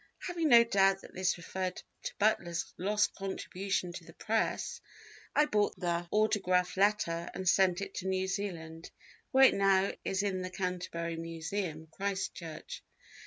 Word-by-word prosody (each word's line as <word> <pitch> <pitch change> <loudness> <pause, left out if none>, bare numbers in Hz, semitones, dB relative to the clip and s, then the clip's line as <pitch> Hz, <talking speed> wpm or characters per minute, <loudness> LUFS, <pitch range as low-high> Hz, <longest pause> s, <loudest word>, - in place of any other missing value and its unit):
Having 340 -3 -1
no 235 -2 +9
doubt 195 -3 +3
that - - -13
this 185 0 0
referred 185 +1 -3 0.3
to - - -5
Butler's 175 -5 0
lost 205 +3 +1
contribution 195 -1 -3
to 175 - -8
the 165 - -14
Press, 225 - -1 0.5
I 300 - +5
bought 210 -7 0
the 175 -1 -1
autograph 190 -4 +2
letter 190 -4 +1
and 190 -1 -4
sent 185 0 +4
it 200 - -5
to 190 - -3
New 190 0 0
Zealand, 170 -5 -4 0.4
where 265 0 +5
it - - +6
now 195 0 +3
is 195 +1 0
in 190 -2 -1
the 185 - -4
Canterbury 180 -3 -3
Museum, 165 0 -4
Christchurch. 190 -4 -4
190 Hz, 150 wpm, -32 LUFS, 175-200 Hz, 0.5 s, no